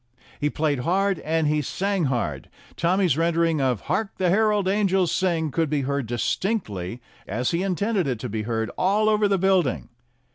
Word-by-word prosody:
He 150 - +1
played 150 -3 0
hard 190 +6 +1
and 160 0 0
he 150 0 +1
sang 195 +4 -1
hard. 115 - -2 0.3
Tommy's 180 -2 +2
rendering 165 -2 +1
of 125 -5 0
"Hark! 195 +7 -2
the 180 -2 +2
Herald 210 -1 +2
Angels 190 -3 +2
Sing" 165 -5 0
could 160 +1 0
be 145 -1 0
heard 140 -2 -2
distinctly 120 - -2 0.2
as 120 +6 -1
he 170 +1 0
intended 195 -1 0
it 125 -3 -1
to 125 - -3
be 110 -1 -3
heard 110 -1 -2
all 205 +4 +2
over 210 -1 +3
the 200 -1 +2
building. 185 -6 +1
165 Hz, 175 wpm, -24 LUFS, 130-195 Hz, 0.3 s, over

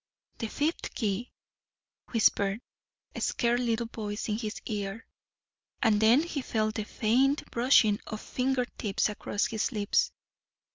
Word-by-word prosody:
"The 225 - -2
fifth 300 +8 -2
key," 215 +2 -2 0.8
whispered 205 -3 +2 0.5
a - - -6
scared 240 0 +1
little 235 -1 0
voice 215 -2 -5
in 210 - 0
his 215 -3 -4
ear. 205 0 -4 0.8
And 215 -3 +4
then 235 +7 +6
he 315 -4 -3
felt 215 -3 0
the 215 -1 -3
faint 260 +7 +1
brushing 235 -4 +4
of 215 - -5
finger 255 +1 0
tips 205 0 +1
across 205 +1 -1
his 225 0 -1
lips. 240 - +1
225 Hz, 135 wpm, -29 LUFS, 210-250 Hz, 0.8 s, then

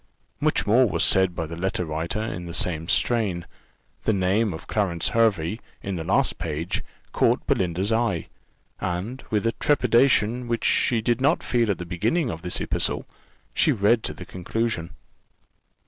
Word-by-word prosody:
Much - - +1
more 120 +3 +4
was - - 0
said 95 -2 +3
by 80 - -2
the 85 +2 -7
letter 90 +1 -1
writer 80 +5 -3
in 90 -6 -5
the 85 - -6
same 80 -2 -2
strain. 100 -6 +1 0.6
The 110 - +3
name 100 +3 +2
of 80 -1 -7
Clarence 95 -6 0
Hervey, 110 -4 +2 0.2
in 100 -1 -3
the 80 - -3
last - - +1
page, 80 0 -3 0.3
caught - - +2
Belinda's 95 +3 0
eye; 110 -7 0 0.5
and 95 +8 -3
with 105 0 0
a 115 - +3
trepidation 125 -3 +2
which 115 -1 -1
she 115 -3 +2
did 120 +2 0
not 145 +5 +2
feel 120 -3 +1
at 100 - +1
the 90 - -6
beginning 115 - 0
of 80 - -6
this 90 - -4
epistle, - - -1 0.5
she - - +3
read 110 +3 +3
the 90 - -6
conclusion. 90 -1 -2
100 Hz, 165 wpm, -25 LUFS, 85-115 Hz, 0.6 s, more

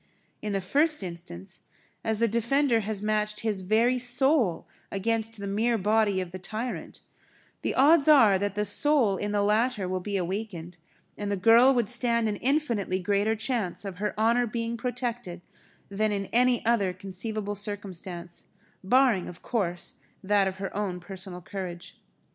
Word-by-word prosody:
In 210 -1 -3
the 195 - 0
first 295 - +2
instance, 170 - -8 0.4
as 220 -1 -1
the 230 +2 +2
defender 235 +3 +2
has 210 -1 -3
matched 210 0 -1
his 210 -4 -1
very 230 +6 +2
soul 245 - +2 0.2
against 225 +2 -1
the 200 - -5
mere 225 +4 +1
body 210 -1 +2
of 180 -2 -5
the 185 - -7
tyrant, 220 +6 -6 0.6
the - - -2
odds 290 +2 +5
are 230 -11 +6
that 205 0 -2
the 210 0 0
soul 270 -6 +3
in 205 +2 -3
the 205 -1 +1
latter 210 -1 +1
will 185 0 -2
be 200 +2 -3
awakened, 180 -2 -5 0.4
and 205 -1 -3
the 200 - 0
girl 230 +7 +6
would 240 -4 +1
stand 235 -1 +1
an 210 -1 -2
infinitely 240 -9 0
greater 205 +3 0
chance 220 -4 -2
of 190 -2 -6
her 210 +1 -3
honour 235 +2 +3
being 230 +1 -3
protected 240 -6 -4 0.5
than 210 +2 -1
in 200 -1 -2
any 245 0 +3
other 215 -6 +2
conceivable 200 +2 -5
circumstance, 190 -4 -4 0.4
barring 240 -2 +3
of 180 0 -12
course, 180 -7 -2 0.3
that 200 0 +2
of 190 0 -4
her 195 0 -6
own 195 -3 -2
personal 180 0 -7
courage. 180 -1 -8
210 Hz, 160 wpm, -27 LUFS, 190-235 Hz, 0.6 s, are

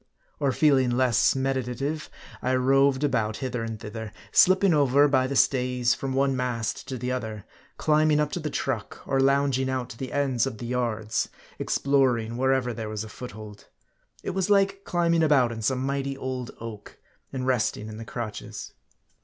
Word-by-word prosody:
Or 140 -2 +2
feeling 135 -2 +3
less 125 0 +3
meditative, 135 +3 -2 0.3
I 130 +1 +1
roved 135 +2 +3
about 110 -6 0
hither 125 -3 -3
and 115 -1 -5
thither; 110 0 -7 0.2
slipping 190 -1 +5
over, 145 -1 +4
by 130 -2 +2
the 140 - -3
stays, 125 -2 +2
from 135 -1 -4
one 135 0 +2
mast 125 -3 -2
to 130 - -4
the 125 +1 -3
other; 110 -5 -4 0.3
climbing 155 -1 +3
up 150 -1 0
to - - -3
the 155 -2 -3
truck; - - -3
or 135 - +1
lounging 135 -1 +2
out 130 -2 -2
to 115 - -10
the 130 - -5
ends 135 -3 +1
of 115 - -5
the 120 - -7
yards; 115 -3 -1 0.3
exploring 125 -5 +1
wherever 130 -1 +1
there 110 -2 -5
was 110 0 -3
a 110 - -9
foothold. 110 -3 -10 0.6
It - - -2
was 190 +1 -1
like 195 -1 +2
climbing 170 -1 +2
about 140 -6 +4
in 115 -1 -6
some 130 +3 0
mighty 140 0 -2
old 130 -2 -4
oak, 110 -3 -9 0.3
and 130 -1 -3
resting 115 -4 0
in 110 0 -8
the 115 - -6
crotches. 115 -2 -6
130 Hz, 175 wpm, -26 LUFS, 115-140 Hz, 0.6 s, slipping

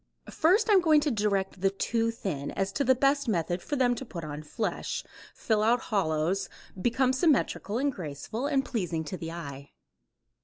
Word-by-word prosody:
First 370 +8 +3
I 425 - +4
am 380 - +6
going 315 -3 +5
to 295 - +1
direct 200 -4 -1
the 195 - +4
too 225 +4 0
thin 180 -11 -4
as 195 0 -2
to 280 - 0
the 260 -1 +4
best 275 +1 +2
method 175 -3 0
for 295 - -3
them 250 -3 +3
to 245 - -5
put 175 -9 -7
on 150 0 -6
flesh, 215 +8 -3 0.3
fill 220 -2 +1
out 235 +3 +3
hollows, 170 0 +1 0.3
become 255 +4 +2
symmetrical 260 - +1
and 280 +3 +1
graceful 175 - -4
and 270 -3 +1
pleasing 175 -8 -2
to 185 +4 -5
the 165 -1 -6
eye. 140 -5 -8
215 Hz, 185 wpm, -28 LUFS, 170-265 Hz, 0.3 s, am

